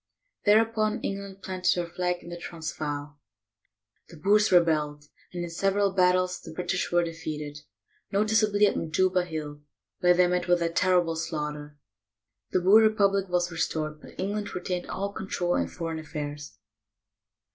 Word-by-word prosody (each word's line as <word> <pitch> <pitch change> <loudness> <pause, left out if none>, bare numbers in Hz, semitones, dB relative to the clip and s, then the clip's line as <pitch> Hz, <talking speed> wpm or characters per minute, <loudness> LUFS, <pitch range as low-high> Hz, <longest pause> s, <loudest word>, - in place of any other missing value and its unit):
Thereupon 220 +1 +3
England 195 0 -5
planted 185 -1 +1
her 175 - -1
flag 180 +1 -2
in - - -10
the 175 - -6
Transvaal. 150 -3 -5 0.9
The 170 - -12
Boers 210 +6 +3
rebelled, 155 -4 +3 0.3
and 175 -1 -4
in 175 - -5
several 195 +3 +1
battles 185 -1 +2
the 160 - -10
British 180 +3 -2
were 175 0 +3
defeated, 150 -3 -5 0.5
noticeably 210 0 +3
at 205 - +1
Majuba 180 +3 +1
Hill, 150 -3 -6 0.4
where 180 0 +5
they 180 0 +5
met 180 +1 0
with 175 -1 +3
a 165 - +1
terrible 175 -1 +2
slaughter. 150 -2 -4 0.7
The 185 - +1
Boer 200 +5 +7
republic 200 -3 +3
was 175 0 0
restored, 155 -2 -2
but - - -14
England 205 +2 -3
retained 180 0 -3
all 200 +1 -3
control 180 -3 -2
in 85 - 0
foreign 160 - -5
affairs. 150 -2 -6
175 Hz, 145 wpm, -27 LUFS, 160-195 Hz, 0.9 s, Boer